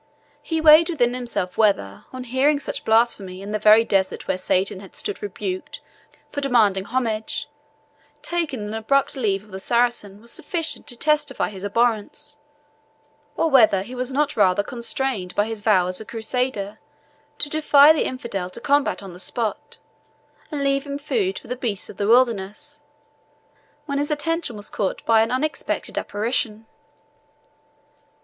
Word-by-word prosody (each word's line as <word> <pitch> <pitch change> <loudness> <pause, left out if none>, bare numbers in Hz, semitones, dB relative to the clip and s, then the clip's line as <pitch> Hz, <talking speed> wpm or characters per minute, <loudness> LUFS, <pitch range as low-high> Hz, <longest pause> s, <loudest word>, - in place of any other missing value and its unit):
He 325 -1 -2
weighed 315 +2 +7
within 245 -8 +1
himself 230 -7 -3
whether, 100 - +1
on 255 0 -6
hearing 265 +4 +2
such - - -5
blasphemy 220 -5 +2
in 205 - -6
the 215 - -1
very 215 +2 +6
desert 195 -3 0
where - - +1
Satan 185 +1 0
had 195 -1 -13
stood 205 - -4
rebuked 190 -2 -5 0.5
for 285 - -3
demanding 215 -8 +3
homage, 225 -3 -2 0.8
taking 325 -8 -2
an 210 +1 -5
abrupt 265 +5 +1
leave 205 -6 0
of 210 - -19
the 190 - -6
Saracen 235 -2 0
was 235 +2 -7
sufficient 330 -3 -2
to 240 - -4
testify 295 -1 +1
his 195 -2 -10
abhorrence; 235 +7 -1 1.0
or 325 - +1
whether 215 -7 +5
he 240 +5 -10
was 255 +1 -2
not 290 +2 0
rather 200 -1 +3
constrained 235 -5 -3
by 205 - +2
his 220 -1 -5
vow 205 -4 +4
as 185 +3 -3
a - - -8
Crusader 220 -2 -3 0.6
to - - +4
defy 300 -1 +6
the 315 - 0
infidel 235 -8 -4
to 185 - -10
combat 280 -3 +1
on 190 -2 -9
the 180 - -12
spot, 220 +2 -3 0.7
and 290 -3 -3
leave 275 0 +1
him 280 0 -3
food 380 +6 -1
for - - -10
the 250 - -3
beasts 225 -6 -3
of - - -17
the 200 - -1
wilderness, 240 +5 +1 1.0
when 280 -2 -2
his 290 - -1
attention 300 -4 -1
was 205 - -7
suddenly 200 -3 -2
caught - - -18
by 225 -1 +5
an 225 - +1
unexpected 275 +5 -2
apparition. 220 0 -2
235 Hz, 160 wpm, -22 LUFS, 205-280 Hz, 1.0 s, weighed